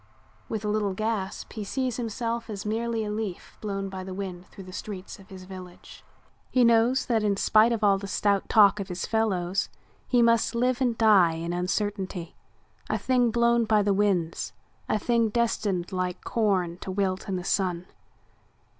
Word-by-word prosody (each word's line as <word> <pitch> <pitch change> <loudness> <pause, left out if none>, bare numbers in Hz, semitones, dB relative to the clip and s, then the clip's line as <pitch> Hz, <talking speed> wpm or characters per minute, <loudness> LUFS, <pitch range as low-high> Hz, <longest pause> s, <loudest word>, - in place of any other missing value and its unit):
With 220 -1 -3
a - - 0
little 210 -2 0
gasp 215 -2 -3
he 215 - -4
sees 255 +3 -2
himself 230 0 -3
as 210 -1 -5
merely 225 +1 -1
a 210 - -3
leaf 210 -4 -5
blown 195 -2 -3
by 190 -1 -6
the 185 0 -7
wind 185 -2 -6
through 195 - -12
the 185 0 -11
streets 195 -1 -7
of 195 +1 -16
his 190 -2 -10
village. 185 -1 -11 0.5
He 255 - +3
knows 235 +3 +4
that 230 -3 +1
in 205 -2 +1
spite 215 +3 +4
of 225 -2 -1
all 200 -1 +4
the 200 - -6
stout 200 0 0
talk 210 -1 +6
of 195 - -4
his 180 -1 -4
fellows 195 -4 0 0.4
he 245 -2 +4
must 230 0 +3
live 250 +2 +1
and 240 -3 +1
die 200 -7 +5
in 165 +1 -4
uncertainty, 185 -1 -2 0.5
a - - +1
thing 250 -2 +2
blown 235 0 +3
by 215 -1 +3
the 200 0 +2
winds, 190 -5 0 0.4
a - - +2
thing 230 +1 +1
destined 210 -5 0
like 185 -1 -3
corn 185 -6 0
to - - -7
wilt 190 0 -1
in 190 - -1
the 180 - -3
sun. 180 -2 0
205 Hz, 180 wpm, -26 LUFS, 185-225 Hz, 0.5 s, talk